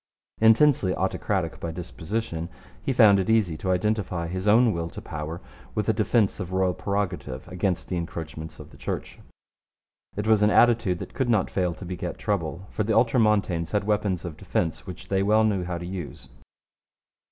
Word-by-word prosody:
Intensely 110 -3 +5
autocratic 95 -2 -1
by 85 - -4
disposition, 85 +1 -4 0.3
he - - -1
found 110 -6 +6
it 95 - -1
easy 110 -8 +3
to 95 - -4
identify 95 -2 0
his 95 +3 -4
own 115 +2 +5
will 85 0 -3
to - - -8
power 75 +2 -6 0.3
with 105 -2 -1
a 110 - +3
defence 110 -1 +1
of 90 -2 -5
royal 95 -1 +1
prerogative 90 -10 -3
against 90 0 -2
the 90 - -2
encroachments 80 -2 -6
of - - -11
the - - -15
Church. - - -5 1.0
It 105 - -2
was 110 -1 +4
an 105 - +5
attitude 115 -6 +4
that - - -8
could 130 -3 -1
not 110 -5 +2
fail 90 -3 0
to 95 - -9
beget 90 -1 -5
trouble, 95 -3 -2
for 105 - -1
the 110 +1 0
Ultramontanes 105 -8 +2
had 105 - +2
weapons 100 -4 0
of 80 -3 -6
defence 80 -1 -2
which 90 -1 -9
they 95 0 +2
well 105 +2 +4
knew 100 -4 +1
how 90 -1 -3
to 85 - -6
use. 80 -7 -7
95 Hz, 180 wpm, -25 LUFS, 85-105 Hz, 1.0 s, found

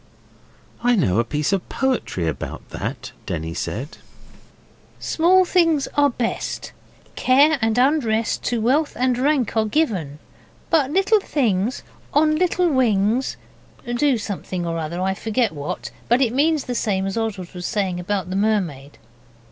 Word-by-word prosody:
'I 245 0 +4
know 115 - +2
a - - +3
piece 150 +8 -1
of 195 - -2
poetry 255 - -1
about 80 - -5
that,' - - -5 0.2
Denny 80 -1 -3
said. 135 - -5 1.0
'Small 365 +3 +3
things 330 -6 +2
are 290 0 +4
best. 240 -2 -3 0.4
Care 285 +4 +4
and 225 +1 +1
unrest 245 -5 +2
To 240 - 0
wealth 275 +7 +1
and 255 0 +1
rank 275 -3 +1
are 220 -1 +2
given, 205 - -1 0.5
But 300 -5 +3
little 390 +7 +3
things 235 - 0 0.3
On 310 +1 +4
little 360 +1 +2
wings 240 - +1 0.5
do 245 +2 +1
something 185 -4 -4
or 165 0 -2
other, 165 +2 -4
I 190 +1 0
forget 225 +3 0
what, 145 -1 -5 0.2
but 240 +2 +4
it 245 -4 +2
means 300 +2 +2
the 250 - -4
same 195 -5 0
as 195 - -3
Oswald 210 -6 -3
was 180 -1 -5
saying 195 -5 -1
about 185 0 -2
the - - -2
mermaid. 185 -10 -1
225 Hz, 150 wpm, -22 LUFS, 185-280 Hz, 1.0 s, I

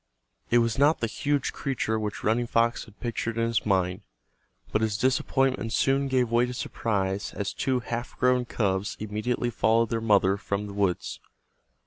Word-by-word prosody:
It 120 - +4
was 115 +1 +1
not 145 +3 +4
the - - 0
huge 140 +5 -1
creature 110 -5 -1
which 105 -1 -4
Running 120 +3 +1
Fox 115 +1 +1
had 105 - -19
pictured 115 -1 -3
in 115 - +2
his 115 -1 0
mind, 95 0 +1 0.7
but 110 - +1
his 110 -2 0
disappointment 130 -1 +1
soon 135 +2 +2
gave 125 -3 +1
way 120 +1 +3
to 125 - -5
surprise 100 -4 -2
as 100 -2 -3
two 130 -2 0
half 120 0 -5
grown 125 -1 +3
cubs 100 -4 -1
immediately 110 +3 -2
followed 115 +1 +2
their 115 -1 0
mother 100 -3 +3
from 100 0 -3
the 100 - -7
woods. 100 -3 -1
115 Hz, 170 wpm, -27 LUFS, 105-125 Hz, 0.7 s, It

